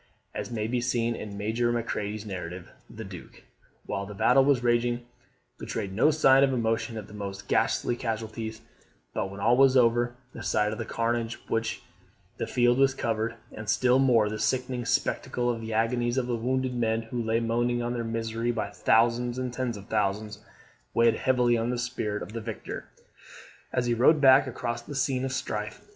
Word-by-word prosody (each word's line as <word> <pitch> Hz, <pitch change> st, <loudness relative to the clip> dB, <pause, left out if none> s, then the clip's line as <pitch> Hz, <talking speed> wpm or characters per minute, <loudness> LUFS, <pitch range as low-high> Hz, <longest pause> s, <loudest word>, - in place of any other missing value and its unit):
As -, -, -4 dB
may 110 Hz, -3 st, -2 dB
be 120 Hz, +2 st, -1 dB
seen 120 Hz, -1 st, 0 dB
in 105 Hz, -2 st, -7 dB
Major 115 Hz, +3 st, 0 dB
Macready's 110 Hz, -2 st, -3 dB
narrative, 90 Hz, -2 st, -6 dB, 0.2 s
the 110 Hz, -, -8 dB
Duke, 95 Hz, -3 st, -11 dB, 0.4 s
while 100 Hz, 0 st, -3 dB
the 105 Hz, -, -8 dB
battle 135 Hz, +6 st, +5 dB
was 135 Hz, -3 st, +3 dB
raging, 120 Hz, 0 st, +1 dB, 0.5 s
betrayed 100 Hz, -4 st, -4 dB
no 115 Hz, +9 st, +4 dB
sign 135 Hz, -3 st, +5 dB
of 135 Hz, -, +3 dB
emotion 115 Hz, -2 st, -1 dB
at 105 Hz, -, -6 dB
the -, -, -14 dB
most 100 Hz, -1 st, -6 dB
ghastly 120 Hz, -, +1 dB
casualties; 110 Hz, -1 st, -4 dB, 0.5 s
but, 95 Hz, -, -2 dB
when 100 Hz, +1 st, -9 dB
all 115 Hz, +4 st, +4 dB
was 135 Hz, 0 st, +5 dB
over, 120 Hz, 0 st, +3 dB, 0.2 s
the -, -, -8 dB
sight 105 Hz, 0 st, +1 dB
of 110 Hz, -, -5 dB
the 115 Hz, -, -3 dB
carnage 115 Hz, 0 st, -1 dB
with -, -, -26 dB
which 115 Hz, 0 st, -1 dB, 0.5 s
the -, -, -3 dB
field 120 Hz, +1 st, +3 dB
was 135 Hz, -1 st, +4 dB
covered, 115 Hz, -1 st, -1 dB, 0.2 s
and 105 Hz, -1 st, -7 dB
still 125 Hz, +3 st, +4 dB
more, 120 Hz, -5 st, +4 dB
the 110 Hz, +1 st, -4 dB
sickening 125 Hz, -1 st, -1 dB
spectacle 120 Hz, +1 st, 0 dB
of 115 Hz, -1 st, -4 dB
the 110 Hz, 0 st, -6 dB
agonies 120 Hz, +2 st, +1 dB
of 130 Hz, -, +1 dB
the 120 Hz, -1 st, -1 dB
wounded 130 Hz, +2 st, -1 dB
men 115 Hz, -2 st, 0 dB
who 120 Hz, +2 st, -4 dB
lay 115 Hz, 0 st, +1 dB
moaning 120 Hz, +1 st, 0 dB
in 120 Hz, 0 st, -2 dB
their 120 Hz, -1 st, -2 dB
misery 115 Hz, +1 st, -2 dB
by 110 Hz, -4 st, -2 dB
thousands 120 Hz, +3 st, +2 dB
and 130 Hz, -1 st, -3 dB
tens 125 Hz, -3 st, -2 dB
of 100 Hz, -, -10 dB
thousands, 105 Hz, +1 st, -1 dB, 0.5 s
weighed 115 Hz, -1 st, +5 dB
heavily 125 Hz, 0 st, +2 dB
on 115 Hz, +1 st, 0 dB
the 125 Hz, -, -1 dB
spirit 120 Hz, -4 st, -3 dB
of 105 Hz, -, -10 dB
the 115 Hz, -, -4 dB
victor, 110 Hz, -2 st, -6 dB, 0.9 s
as 125 Hz, -1 st, 0 dB
he 120 Hz, -, +1 dB
rode 130 Hz, +7 st, +5 dB
back 135 Hz, -1 st, +6 dB
across 120 Hz, -1 st, -3 dB
the 145 Hz, +4 st, -9 dB
scene 130 Hz, -1 st, 0 dB
of 135 Hz, -, -2 dB
strife. 105 Hz, -5 st, -4 dB
115 Hz, 190 wpm, -27 LUFS, 110-125 Hz, 0.9 s, back